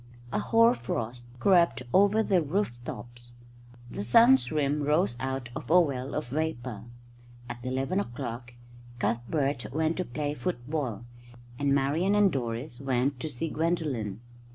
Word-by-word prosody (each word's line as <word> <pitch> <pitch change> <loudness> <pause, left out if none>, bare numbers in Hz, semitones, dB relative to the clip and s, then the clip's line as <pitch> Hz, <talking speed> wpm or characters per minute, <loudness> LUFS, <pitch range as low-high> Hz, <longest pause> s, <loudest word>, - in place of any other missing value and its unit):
A - - +1
hoar 230 +1 +4
frost 120 0 -4
crept 170 -2 +3
over 205 +3 +5
the 190 -4 +2
roof 150 - -2
tops. 120 0 -8 0.6
The - - -4
sun's 230 - +5
rim 150 -1 +1
rose 150 -1 +2
out 130 -2 -3
of - - -7
a 180 +3 +7
well 135 -5 -1
of 150 -4 -3
vapour. 130 -7 -3 0.6
At 120 0 -7
eleven 135 +9 -1
o'clock 120 -5 -5 0.4
Cuthbert 125 +3 -1
went 160 +3 0
to 185 - -1
play 145 +3 -3
football, 135 - -3 0.5
and 140 -1 +2
Marian 155 +9 +2
and 205 -2 +5
Doris 120 0 -4
went 130 0 0
to 155 - -3
see 150 +3 -4
Gwendolen. 150 - -2
140 Hz, 140 wpm, -28 LUFS, 120-165 Hz, 0.6 s, a